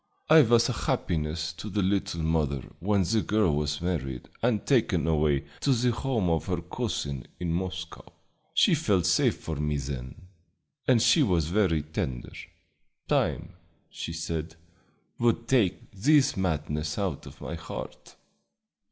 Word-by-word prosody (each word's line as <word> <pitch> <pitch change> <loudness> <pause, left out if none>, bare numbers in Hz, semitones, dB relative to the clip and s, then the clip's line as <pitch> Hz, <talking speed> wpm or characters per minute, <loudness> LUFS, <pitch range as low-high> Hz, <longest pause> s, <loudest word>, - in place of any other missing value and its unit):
It 155 -7 +8
was 115 0 +5
a - - -1
happiness 80 0 -2
to 90 +7 -7
the 105 0 0
little 95 -3 0
mother 75 -4 0 0.2
when 100 +2 +2
the 110 +5 +1
girl 105 -8 +2
was 75 0 -1
married 65 -8 -3
and 115 -3 +1
taken 110 - +2
away 75 -3 +2
to 140 - +2
the 125 0 +2
home 120 -5 -1
of 85 +1 0
her 90 -2 -1
cousin 70 -5 -4
in 85 -2 -1
Moscow. 90 -7 -5 0.4
She - - +5
felt 95 -5 +2
safe 90 +2 +3
for 80 -2 -5
me 75 0 -1
then, 65 -2 -5 0.7
and 120 -3 +4
she 125 +6 +5
was 85 - +2
very 90 -5 +2
tender. 65 -5 -4 0.7
Time, - - 0 0.4
she - - -5
said, 80 -1 -4 0.6
would 115 0 +1
take 115 -9 +1
this 135 +7 +3
madness 75 -4 -2
out 95 -8 -2
of - - -12
my - - -6
heart." 85 0 -8
85 Hz, 145 wpm, -27 LUFS, 75-105 Hz, 0.7 s, It